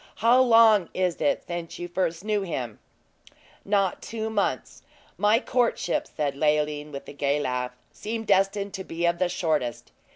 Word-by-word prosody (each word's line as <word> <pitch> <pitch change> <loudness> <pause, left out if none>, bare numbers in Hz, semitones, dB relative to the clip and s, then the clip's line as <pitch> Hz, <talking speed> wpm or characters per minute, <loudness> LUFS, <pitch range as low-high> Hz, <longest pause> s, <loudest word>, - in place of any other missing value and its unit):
How 235 +3 +4
long 225 -6 +5
is 180 -2 -1
it 285 - +1
since 175 -1 -6
you 175 - -5 0.4
knew 210 -1 0
him 130 -11 -3
first?" - - -29 0.3
"Not 195 -2 0
two 220 -1 -4
months. 205 -2 -2 0.3
My 210 +2 +3
courtships," 240 -9 -1
said 145 -2 0
Leoline, 150 0 0
with 140 -1 -8
a - - -8
gay 140 0 0
laugh, 125 -2 -2 0.2
"seem 225 +1 -5
destined 200 0 +1
to 190 -2 -5
be 170 -1 -3
of 170 0 +1
the 180 -1 +1
shortest. 155 -9 -2
180 Hz, 160 wpm, -26 LUFS, 150-215 Hz, 0.4 s, long